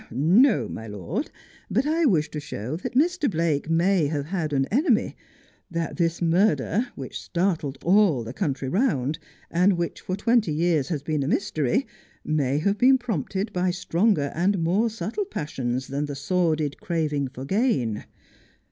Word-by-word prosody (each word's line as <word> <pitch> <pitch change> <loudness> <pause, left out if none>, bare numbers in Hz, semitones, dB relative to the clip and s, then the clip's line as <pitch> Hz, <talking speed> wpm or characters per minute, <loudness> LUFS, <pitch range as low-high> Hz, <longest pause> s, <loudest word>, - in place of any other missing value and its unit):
Xo, 185 - +4
my 110 - -7
lord, 130 - -4 0.4
but 265 - +1
I 320 +2 +2
wish 160 - +1
to 150 - -4
show 135 -2 -5
that 185 - -6
Mr. 315 +1 +2
Blake 165 -4 0
may 170 0 +3
have 145 -1 -2
had 160 -2 -2
an 135 -2 +1
enemy; 255 - +2 0.5
that 170 -1 -3
this 170 0 0
murder, 200 +6 +2
which 135 - -6
startled 170 -6 -1
all 180 - +4
the 115 +2 -7
country 135 -5 -2
round, 155 - 0 0.3
and 180 +4 +4
which 170 -1 -3
for 185 - -3
twenty 220 -4 +2
years 160 -3 +1
has 150 -4 -3
been 155 -1 -1
a 135 - -1
mystery, 195 - 0 0.4
may 145 -3 +1
have 200 +6 0
been 265 +1 +6
prompted 200 - -3
by 180 0 +1
stronger 175 -3 +1
and 180 +1 +1
more 200 +8 +2
subtle 225 - -3
passions 130 - -3
than 140 +2 -2
the 145 -1 -5
sordid 155 -1 0
craving 150 -5 -1
for 130 +1 -8
gain. 165 - 0
170 Hz, 160 wpm, -25 LUFS, 145-205 Hz, 0.5 s, been